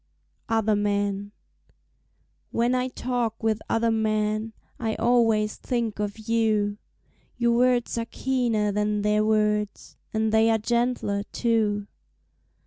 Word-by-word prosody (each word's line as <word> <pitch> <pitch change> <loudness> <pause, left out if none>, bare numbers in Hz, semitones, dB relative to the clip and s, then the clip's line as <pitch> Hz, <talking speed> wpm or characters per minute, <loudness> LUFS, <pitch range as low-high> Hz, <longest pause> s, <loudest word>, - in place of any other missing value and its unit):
Other 220 -1 +2
Men 205 -1 -1 1.2
When 240 +2 +1
I 255 0 +1
talk 240 -3 -3
with 220 -1 +1
other 230 0 +2
men 215 0 0 0.3
I 220 -2 -1
always 225 -3 +2
think 235 -4 -2
of 205 0 -2
you 215 -2 0 0.6
Your 235 -1 +2
words 245 -1 +2
are 230 - -3
keener 235 -6 0
than 210 0 0
their 210 0 +2
words, 210 -1 0
And 220 0 0
they 220 +1 +4
are 225 - +3
gentler, 235 -2 0
too. 215 -3 +1
220 Hz, 120 wpm, -25 LUFS, 210-235 Hz, 1.2 s, they